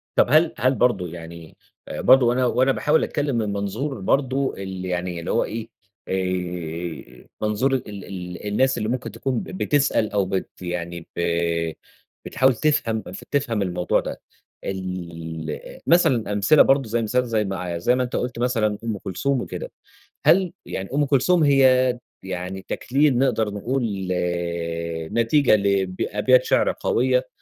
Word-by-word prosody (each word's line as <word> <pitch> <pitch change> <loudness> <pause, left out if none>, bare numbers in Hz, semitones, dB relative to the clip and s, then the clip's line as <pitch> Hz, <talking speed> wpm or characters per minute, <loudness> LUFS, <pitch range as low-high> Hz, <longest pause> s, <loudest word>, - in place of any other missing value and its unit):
طب - - +5
هل 155 +4 +4
هل 130 +1 +2
برضو 115 -9 +2
يعني 85 -1 -10 0.3
آآ، - - -5
برضو 130 -2 +6
وأنا 125 +1 +2
وأنا 130 +2 +3
باحاول 150 +3 +2
أتكلّم 145 -3 -1
من 105 -3 -1
منظور 110 +7 -3
برضو 135 +5 +1
ال 95 -1 -6
يعني 90 -1 -3
اللي 85 - -4
هو - - +2
إيه 115 +1 -5 0.4
آآ، 90 -7 -4
منظور 110 +6 +1
ال 130 - -1 0.2
ال 90 +1 -7
الناس 130 +6 +2
اللي 110 -1 -2
ممكن 120 -2 -3
تكون 120 +3 -2
ب - - -5
بتسأل 145 - +1
أو 100 -1 +1
بت 95 0 -2
يعني 85 -1 -5
ب - - -2 1.0
بتحاول 130 -1 +2
تفهم 115 -6 +1 0.3
تفهم 130 -7 0
الموضوع 90 -2 +1
ده، - - -6 0.4
ال 85 -4 -6
مثلًا 125 -11 +3
أمثلة 105 +10 +5
برضو 135 -3 +3
زي 115 +2 0
مثال 120 +3 +1
ما 125 - -6
زي 110 -2 0
مع 90 -3 -3
زي 105 +9 +2
ما 125 - +1
أنت 125 - -4
قلت 125 -1 -2
مثلًا 115 -4 +1
أم 115 -2 -2
كلثوم 120 +8 -1
وكده. - - -6 0.5
هل 185 -1 +4
يعني 95 0 -5
أم 145 0 +2
كلثوم 150 +5 +3
هي 130 -3 +4 0.3
يعني 95 +1 -5
تكليل 140 0 +2
نقدر 120 -5 +2
نقول 120 +6 -2 1.3
نتيجة 115 +2 +4
ل 100 -2 +1
أبيات 125 +5 +3
شعر - - +3
قويّة، 125 +1 +1
110 Hz, 150 wpm, -23 LUFS, 95-130 Hz, 1.3 s, برضو